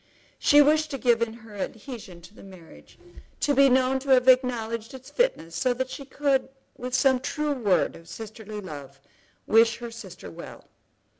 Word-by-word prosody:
She 290 Hz, 0 st, +6 dB
wished 310 Hz, +1 st, +2 dB
to 275 Hz, -, -4 dB
give 240 Hz, -3 st, +2 dB
in 230 Hz, -1 st, 0 dB
her 215 Hz, -, -13 dB
adhesion 205 Hz, -3 st, -7 dB
to 175 Hz, +4 st, -15 dB
the -, -, -15 dB
marriage, 185 Hz, -4 st, -15 dB, 0.4 s
to 290 Hz, -, +2 dB
be 275 Hz, 0 st, +6 dB
known 260 Hz, +1 st, +2 dB
to 275 Hz, +1 st, -9 dB
have 255 Hz, -1 st, +5 dB
acknowledged 240 Hz, -2 st, +2 dB
its 260 Hz, 0 st, -12 dB
fitness 170 Hz, -, 0 dB
so 245 Hz, +9 st, +1 dB
that 260 Hz, +1 st, -3 dB
she 275 Hz, -, -7 dB
could, 275 Hz, -1 st, 0 dB, 0.3 s
with 250 Hz, 0 st, -4 dB
some 260 Hz, -1 st, +3 dB
true 300 Hz, +3 st, -2 dB
word 210 Hz, -9 st, +1 dB
of 165 Hz, 0 st, -15 dB
sisterly 215 Hz, +2 st, -8 dB
love, 140 Hz, -6 st, -10 dB, 0.5 s
wish 225 Hz, +1 st, +4 dB
her 235 Hz, -1 st, -7 dB
sister 205 Hz, -, -10 dB
well. -, -, -11 dB
240 Hz, 175 wpm, -26 LUFS, 210-265 Hz, 0.5 s, She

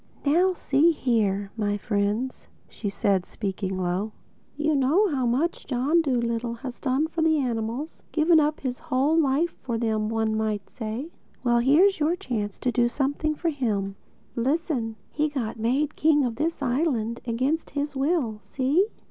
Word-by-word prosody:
"Now 360 Hz, +6 st, +3 dB
see 290 Hz, +1 st, +3 dB
here, 210 Hz, -9 st, 0 dB
my 205 Hz, -2 st, 0 dB
friends," 210 Hz, +5 st, -1 dB, 0.2 s
said 200 Hz, -2 st, 0 dB
she -, -, -25 dB
speaking 190 Hz, -2 st, -3 dB
low: 185 Hz, +4 st, -1 dB, 0.4 s
"you 305 Hz, +1 st, +1 dB
know 295 Hz, +10 st, +3 dB
how 260 Hz, -5 st, 0 dB
much 280 Hz, +9 st, 0 dB
John 280 Hz, +6 st, +2 dB
Dolittle 235 Hz, -4 st, -1 dB
has 250 Hz, +1 st, -7 dB
done 270 Hz, +2 st, +1 dB
for 325 Hz, +1 st, -3 dB
the 320 Hz, -1 st, +4 dB
animals—given 295 Hz, +6 st, +1 dB
his 255 Hz, -2 st, -3 dB
whole 295 Hz, 0 st, +1 dB
life 315 Hz, +2 st, +2 dB
up 235 Hz, -, 0 dB
to 235 Hz, -, -1 dB
them, 215 Hz, -1 st, 0 dB
one 220 Hz, -1 st, 0 dB
might 215 Hz, -2 st, -2 dB
say. 235 Hz, +7 st, -5 dB, 0.3 s
Well, 240 Hz, -1 st, +3 dB
here 285 Hz, +10 st, +5 dB
is 395 Hz, -4 st, +2 dB
your 315 Hz, +3 st, +2 dB
chance 215 Hz, -, -3 dB
to 250 Hz, -, +1 dB
do 240 Hz, -1 st, +2 dB
something 285 Hz, +4 st, -1 dB
for 335 Hz, +2 st, -1 dB
him. 210 Hz, -9 st, -1 dB, 0.4 s
Listen: 255 Hz, -3 st, -1 dB, 0.2 s
he 300 Hz, 0 st, 0 dB
got 235 Hz, -6 st, -4 dB
made 270 Hz, +7 st, 0 dB
king 300 Hz, -2 st, +4 dB
of 235 Hz, -2 st, -3 dB
this 315 Hz, 0 st, -1 dB
island 245 Hz, -4 st, 0 dB
against 260 Hz, +8 st, 0 dB
his 285 Hz, 0 st, -3 dB
will, 270 Hz, -6 st, 0 dB
see? 265 Hz, -, +1 dB
255 Hz, 160 wpm, -26 LUFS, 225-300 Hz, 0.4 s, here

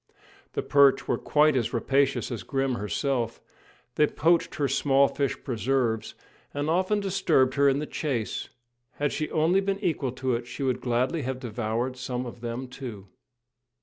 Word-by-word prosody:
The -, -, -2 dB
perch 140 Hz, -1 st, +4 dB
were -, -, 0 dB
quite 150 Hz, -1 st, +3 dB
as 120 Hz, -4 st, 0 dB
rapacious 135 Hz, +3 st, +1 dB
as 115 Hz, -5 st, -4 dB
Grim 135 Hz, +6 st, -1 dB
herself; 120 Hz, +2 st, -1 dB, 0.5 s
they 150 Hz, -, +3 dB
poached 170 Hz, +3 st, +2 dB
upon 145 Hz, -, -5 dB
her -, -, +3 dB
small 135 Hz, +1 st, +3 dB
fish 140 Hz, -1 st, -1 dB
preserves, 120 Hz, -3 st, -1 dB, 0.4 s
and 145 Hz, +2 st, 0 dB
often 185 Hz, +4 st, +2 dB
disturbed 175 Hz, -9 st, +2 dB
her 140 Hz, 0 st, +4 dB
in 135 Hz, -, +2 dB
the 150 Hz, -, -2 dB
chase. 130 Hz, -8 st, -3 dB, 0.4 s
Had 145 Hz, -1 st, -1 dB
she 155 Hz, -, -2 dB
only 165 Hz, +5 st, +2 dB
been 195 Hz, 0 st, -1 dB
equal 150 Hz, -8 st, -1 dB
to 130 Hz, 0 st, -1 dB
it, 120 Hz, 0 st, -3 dB
she 125 Hz, +3 st, -5 dB
would 130 Hz, -2 st, 0 dB
gladly 130 Hz, +6 st, 0 dB
have 130 Hz, -1 st, -3 dB
devoured 120 Hz, +1 st, -2 dB
some 125 Hz, 0 st, -3 dB
of 120 Hz, -1 st, -9 dB
them, 120 Hz, +2 st, -4 dB
too. 120 Hz, -7 st, -8 dB
135 Hz, 170 wpm, -27 LUFS, 120-145 Hz, 0.5 s, perch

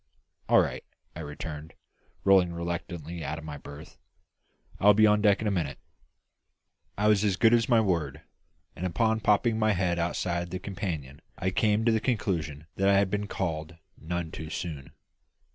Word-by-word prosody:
"All -, -, +7 dB
right," -, -, -3 dB, 0.3 s
I -, -, -7 dB
returned, 75 Hz, +1 st, -7 dB, 0.5 s
rolling 95 Hz, -3 st, +4 dB
reluctantly 85 Hz, -1 st, -5 dB
out 75 Hz, -, -3 dB
of 80 Hz, -, -8 dB
my 75 Hz, -2 st, -6 dB
berth; 70 Hz, +2 st, -12 dB, 0.8 s
"I 100 Hz, -, +2 dB
will 105 Hz, -, +8 dB
be 110 Hz, +1 st, +6 dB
on 105 Hz, 0 st, +4 dB
deck 105 Hz, 0 st, +3 dB
in -, -, 0 dB
a -, -, +1 dB
minute." 80 Hz, -8 st, -2 dB, 1.2 s
I 105 Hz, +1 st, +2 dB
was 105 Hz, -1 st, +4 dB
as 100 Hz, -3 st, +2 dB
good 115 Hz, +4 st, +4 dB
as 115 Hz, 0 st, +3 dB
my 120 Hz, -2 st, +5 dB
word; 80 Hz, -8 st, -1 dB, 0.5 s
and 90 Hz, -, -2 dB
upon 110 Hz, +5 st, +1 dB
popping 110 Hz, +2 st, +2 dB
my 110 Hz, -1 st, +3 dB
head 90 Hz, -2 st, 0 dB
outside 85 Hz, 0 st, -1 dB
the 90 Hz, -, -4 dB
companion 85 Hz, -8 st, -5 dB, 0.2 s
I 95 Hz, -, -1 dB
came 105 Hz, +3 st, +2 dB
to 115 Hz, -, +4 dB
the 110 Hz, -, +2 dB
conclusion 80 Hz, -, -2 dB
that 95 Hz, 0 st, +3 dB
I 100 Hz, -, +5 dB
had 100 Hz, -1 st, +2 dB
been 105 Hz, 0 st, -1 dB
called 80 Hz, -4 st, -4 dB, 0.2 s
none 85 Hz, 0 st, -4 dB
too 80 Hz, -1 st, -7 dB
soon. 75 Hz, -6 st, -6 dB
90 Hz, 180 wpm, -28 LUFS, 80-105 Hz, 1.2 s, will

